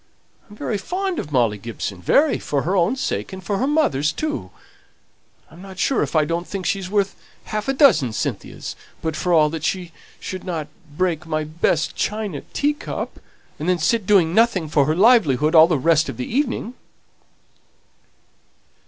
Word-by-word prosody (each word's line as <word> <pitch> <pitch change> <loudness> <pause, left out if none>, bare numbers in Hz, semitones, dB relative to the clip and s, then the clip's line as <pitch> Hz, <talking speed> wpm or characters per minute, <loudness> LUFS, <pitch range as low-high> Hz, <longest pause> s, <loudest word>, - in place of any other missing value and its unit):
I'm 210 - -13
very 210 0 -3
fond 370 - -2
of 150 - -6
Molly 115 -6 +2
Gibson, 100 -4 -6
very, 285 - +3
for 140 -2 -2
her 185 +5 0
own 185 +7 +2
sake 260 - -3
and 190 -1 -8
for 195 +2 -2
her 265 - +1
mother's 220 - +2
too; 310 - -4 1.0
I'm 170 +3 -14
not 190 -1 -11
sure 270 - +1
if - - -2
I 155 -1 +4
don't 170 +2 -3
think 195 -2 -5
she's 195 -2 -1
worth 200 -1 0 0.3
half 215 +2 -4
a 270 - +1
dozen 240 - +4
Cynthias, - - -4 0.3
but 160 -1 -2
for 175 +4 -1
all 155 -3 +4
that 160 -2 -5
she 175 0 -2 0.3
shouldn't 175 -5 -5 0.3
break 175 -2 0
my 155 -1 -1
best 155 +1 0
china 210 -7 -2
teacup, 295 +1 -2 0.4
and 155 +4 -2
then 180 - +3
sit 205 +5 0
doing 180 -6 +4
nothing 200 -7 +2
for 145 -2 +3
her 155 - +1
livelihood 175 - +4
all 160 -1 +8
the 165 -3 +1
rest 160 +1 +2
of 125 - -6
the 125 - -3
evening." 250 -2 -2
180 Hz, 170 wpm, -21 LUFS, 155-215 Hz, 1.0 s, all